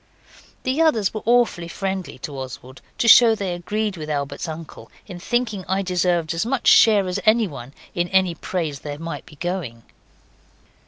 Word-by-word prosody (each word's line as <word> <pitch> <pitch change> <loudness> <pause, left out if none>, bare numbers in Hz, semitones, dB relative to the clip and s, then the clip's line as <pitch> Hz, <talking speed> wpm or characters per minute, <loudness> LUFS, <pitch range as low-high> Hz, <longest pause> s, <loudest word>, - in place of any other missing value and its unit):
The 260 +5 0
others 230 -12 +2
were 215 - -4
awfully 235 -8 +2
friendly 190 -1 -4
to 145 - -5
Oswald, 130 0 -8 0.2
to 235 - 0
show 230 -1 +8
they 195 -4 -3
agreed 205 +3 -3
with 155 -1 -7
Albert's 140 0 -3
uncle 160 0 -9 0.2
in 180 -4 -9
thinking 225 -1 -1
I 190 +2 0
deserved 180 -3 0
as 165 +3 -1
much 245 +2 -2
share 205 -4 +6
as 180 +2 -2
anyone 195 - +1 0.2
in 175 0 -1
any 190 -1 +2
praise 160 -3 -4
there 145 -1 -6
might 165 -2 -7
be 150 - -14
going. 155 -9 -4
180 Hz, 165 wpm, -22 LUFS, 155-215 Hz, 0.2 s, show